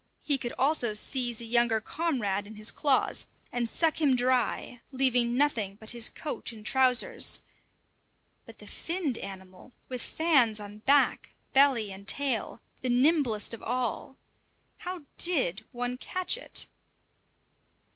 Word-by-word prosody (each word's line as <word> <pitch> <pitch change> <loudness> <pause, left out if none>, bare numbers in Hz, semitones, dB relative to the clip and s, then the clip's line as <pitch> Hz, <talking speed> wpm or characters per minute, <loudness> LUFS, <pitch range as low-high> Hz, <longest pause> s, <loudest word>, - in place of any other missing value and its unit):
He 285 -3 +3
could 240 -2 -4
also 260 -6 +2
seize 240 +1 +1
a - - -6
younger 235 -1 +2
comrade 215 - -2
in 215 - -11
his 215 +1 -1
claws, 280 -3 +1 0.2
and 240 -1 -2
suck 320 +3 +1
him 280 -4 +4
dry, 245 -1 0
leaving 250 -2 +2
nothing 230 -9 0
but 220 - -6
his 235 -1 +1
coat 300 -5 -5
and 215 -2 -13
trousers; 255 0 +3 1.1
but - - -13
the - - -13
finned 330 -8 -3
animal, 190 +4 -9 0.2
with 250 -2 -4
fans 265 -10 +2
on 205 0 -9
back, 280 +5 +2 0.2
belly, 265 -7 +4
and 195 +1 -10
tail, 265 -5 0 0.2
the 255 - -2
nimblest 250 -4 +2
of 230 - -8
all 250 +2 -2 0.6
how 360 -2 -7 0.2
did 220 - +2
one 245 +1 -4
catch 370 - -1
it? - - -2
245 Hz, 135 wpm, -28 LUFS, 220-280 Hz, 1.1 s, him